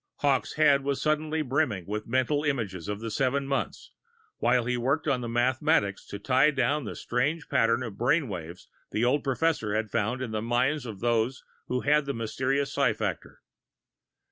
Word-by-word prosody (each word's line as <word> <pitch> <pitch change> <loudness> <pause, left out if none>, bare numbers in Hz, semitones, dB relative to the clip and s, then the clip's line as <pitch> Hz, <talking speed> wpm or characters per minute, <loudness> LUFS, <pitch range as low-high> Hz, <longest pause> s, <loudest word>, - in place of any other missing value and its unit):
Hawkes' 140 -3 +1
head 145 -3 +4
was 140 0 -1
suddenly 155 +1 0
brimming 130 - 0
with 105 +2 -4
mental 130 +5 +1
images 110 - -2
of 105 +1 -4
the 115 -1 -4
seven 135 +4 0
months, 135 0 -3 0.5
while 120 0 +2
he 125 0 0
worked 135 +6 0
on 125 -2 +1
the 120 - -4
mathematics 120 -2 +1
to 100 - -6
tie 130 +7 +3
down 140 0 0
the - - -5
strange 145 +6 -1
pattern 120 -2 +2
of 110 -5 -7
brain 135 +5 +2
waves 90 -3 -7 0.2
the 110 +3 0
old 135 +4 +2
professor 135 -6 0
had 110 -1 -1
found 115 +3 -1
in 115 - -5
the 110 -1 -2
minds 125 +4 0
of 105 -4 -8
those 120 +2 0 0.2
who 125 0 -1
had 150 0 +3
the 140 - -2
mysterious 135 +5 -1
psi 135 -5 +2
factor. 110 - -5
125 Hz, 180 wpm, -27 LUFS, 115-140 Hz, 0.5 s, head